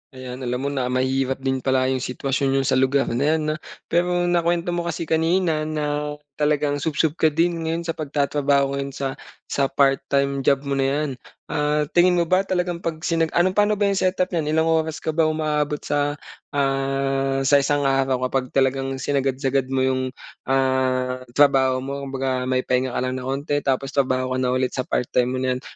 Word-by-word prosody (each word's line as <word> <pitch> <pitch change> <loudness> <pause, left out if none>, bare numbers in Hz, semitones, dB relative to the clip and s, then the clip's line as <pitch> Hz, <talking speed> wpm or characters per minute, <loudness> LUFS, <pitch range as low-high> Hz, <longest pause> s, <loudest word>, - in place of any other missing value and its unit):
Ayan, 130 -1 -7
alam 125 +1 -1
mo 140 - 0
na 130 -3 -1
mahirap 130 +1 0
din 130 0 0
pala 130 0 +1
'yong 130 - 0
sitwasyon 135 +2 -1
niyo 135 - +3
sa 130 - +2
lugar 135 +1 +3
na 120 +4 0
'yan, 160 - -1
'no? - - -2 0.4
Pero 175 +1 +2
nakuwento 175 0 +1
mo 175 0 -2
kasi 170 - -3
kanina 160 0 +1
na 150 -1 -2 0.2
talagang 150 -1 +1
subsob 160 +1 0
ka 160 - +5
din 165 +1 0
ngayon 165 +1 -1
sa 165 - -2
pagtatrabaho 140 -2 0
ngayon 140 0 -4
sa 140 - -2 0.4
sa 140 -1 0
part-time 140 0 +1
job 135 +1 +2
mo 140 - -5
na 135 - +2
'yan. 145 +2 0 0.4
Ah, 150 0 +1
tingin 180 +1 +4
mo 175 - +3
ba 185 +3 +1
talagang 180 -2 -1
'pag 165 -2 -3
sinag 165 -1 +1
ano, 175 +2 +4
paano 210 +2 +2
ba 205 - -1
'yong 195 - 0
setup 185 0 0
niyan? 155 -3 -1
Ilang 160 - +3
oras 160 -1 -1
ka 160 - 0
ba 160 0 +2
umaabot 150 -1 -1
sa, 145 0 0 0.4
ah, 135 0 0
sa 140 +1 +5
isang 145 +1 +1
araw 135 -2 +1
kapag 130 -1 -2
talagang 135 0 +1
sinagad-sagad 135 0 0
mo 130 0 0
'yong, 130 0 -1 0.3
ah, 130 -1 0
trabaho 130 -2 +4
mo? 140 +1 -4
Kumbaga, 130 -1 -2
may 130 0 +1
pahinga 125 0 0
ka - - 0
lang 130 0 -2
na 125 - -6
'onti 140 +2 -1
tapos 135 0 -1
trabaho 130 -2 0
ka 130 - 0
na 130 - +1
ulit 130 0 0
sa 130 - -3
part-time 125 0 +1
mo - - -2
na 130 -1 0
'yan - - -22
140 Hz, 195 wpm, -22 LUFS, 130-155 Hz, 0.4 s, ka